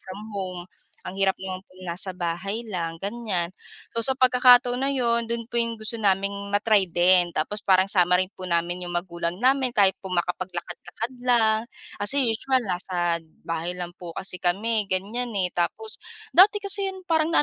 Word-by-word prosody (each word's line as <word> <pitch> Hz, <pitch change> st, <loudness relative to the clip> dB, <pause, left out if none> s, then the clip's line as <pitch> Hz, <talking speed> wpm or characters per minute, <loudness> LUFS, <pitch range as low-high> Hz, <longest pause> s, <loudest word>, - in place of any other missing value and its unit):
from 185 Hz, +2 st, -9 dB
home 185 Hz, -3 st, -5 dB, 0.4 s
ang 190 Hz, -, -7 dB
hirap 195 Hz, -1 st, +3 dB
naman 190 Hz, -1 st, -6 dB
pong 185 Hz, 0 st, -17 dB
nasa 185 Hz, +1 st, -3 dB
bahay 185 Hz, +6 st, -3 dB
lang 165 Hz, -4 st, -3 dB
ganiyan. 200 Hz, -5 st, -2 dB, 0.4 s
So, 230 Hz, -1 st, +1 dB
sa 265 Hz, -, +1 dB
pagkakataon 250 Hz, -1 st, +5 dB
na 270 Hz, -, 0 dB
yun 235 Hz, -4 st, +1 dB
dun 230 Hz, 0 st, -4 dB
po 235 Hz, -, -1 dB
yung 230 Hz, 0 st, 0 dB
gusto 220 Hz, +1 st, -4 dB
naming 200 Hz, -2 st, +2 dB, 0.2 s
ma-try 205 Hz, -2 st, +3 dB
din 175 Hz, 0 st, +4 dB
tapos 160 Hz, +7 st, -2 dB
parang 190 Hz, -1 st, +3 dB
sama 180 Hz, -1 st, +4 dB
rin 185 Hz, -, -6 dB
po 185 Hz, -, -6 dB
namin 175 Hz, +1 st, -1 dB
yung 175 Hz, -, -6 dB
magulang 170 Hz, -1 st, -3 dB
namin 260 Hz, -1 st, +2 dB
kahit 195 Hz, -2 st, +4 dB
po -, -, -11 dB
makapaglakad-lakad 180 Hz, +6 st, -4 dB
lang 220 Hz, -3 st, +4 dB, 0.4 s
kasi 240 Hz, +8 st, +1 dB
usual 260 Hz, +3 st, +1 dB
nasa 175 Hz, -1 st, -1 dB, 0.2 s
bahay 165 Hz, +2 st, -3 dB
lang 175 Hz, -1 st, -5 dB
po 170 Hz, -2 st, -8 dB
kasi 185 Hz, -1 st, -6 dB
kami 210 Hz, +5 st, +1 dB
gan'yan, 200 Hz, +6 st, -1 dB, 0.2 s
eh. 180 Hz, -, 0 dB
Tapos 425 Hz, -, -3 dB, 0.3 s
dati 410 Hz, +3 st, +6 dB
kasi 400 Hz, 0 st, 0 dB
yun 380 Hz, -1 st, -6 dB
parang 325 Hz, -1 st, +1 dB
na -, -, +6 dB
195 Hz, 175 wpm, -25 LUFS, 180-235 Hz, 0.4 s, dati